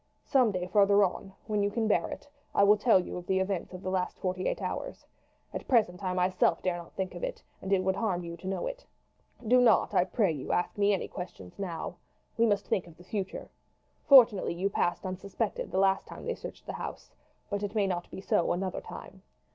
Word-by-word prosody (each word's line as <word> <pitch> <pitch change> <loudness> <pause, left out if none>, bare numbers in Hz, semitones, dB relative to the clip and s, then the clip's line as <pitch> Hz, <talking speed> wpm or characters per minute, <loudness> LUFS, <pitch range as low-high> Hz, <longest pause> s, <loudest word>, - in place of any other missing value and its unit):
Some 255 -5 +4
day 180 -2 -2
farther 200 +2 +5
on, 195 +1 -2
when 210 -2 0
you 200 - +2
can 220 +1 -1
bear 175 -5 +2
it, - - -8 0.3
I - - +5
will 205 +1 +7
tell 215 -1 +4
you 180 - -5
of 175 0 -8
the 190 - +2
events 190 -2 -2
of 185 0 -9
the 185 - -2
last 185 -1 -1
forty 185 0 -2
eight - - -1
hours. - - -5 0.5
At - - -5
present 210 -7 +2
I 185 - 0
myself 180 0 +2
dare 180 -2 0
not 170 -1 -10
think 190 -1 -3
of - - -8
it, - - -4 0.2
and 190 - -5
it 190 -1 +3
would 190 0 +1
harm 185 -6 -1
you 170 0 -6
to 185 - -9
know 190 - -2
it. - - -5 0.6
"Do 250 +2 +6
not, 245 - +4
I 180 - +4
pray 195 -1 +1
you, 145 -4 -4
ask 175 - 0
me 205 0 +3
any 195 - 0
questions 135 - -9
now. 175 -2 -4 0.4
We 230 0 +3
must 205 -2 +1
think 180 - -1
of 165 -1 -15
the 175 - -14
future. 190 +1 -5 0.5
Fortunately 235 -10 +6
you 195 +3 -1
passed 175 -2 0
unsuspected 195 +3 -3
the - - -3
last 195 0 +2
time - - -9
they - - -1
searched - - -9
the - - -5
house; - - -7 0.4
but 200 0 -1
it 205 +1 -4
may 205 -2 +3
not 175 -2 -2
be - - -8
so 175 - +1
another 185 +1 -3
time. - - -10
190 Hz, 225 wpm, -29 LUFS, 180-205 Hz, 0.6 s, will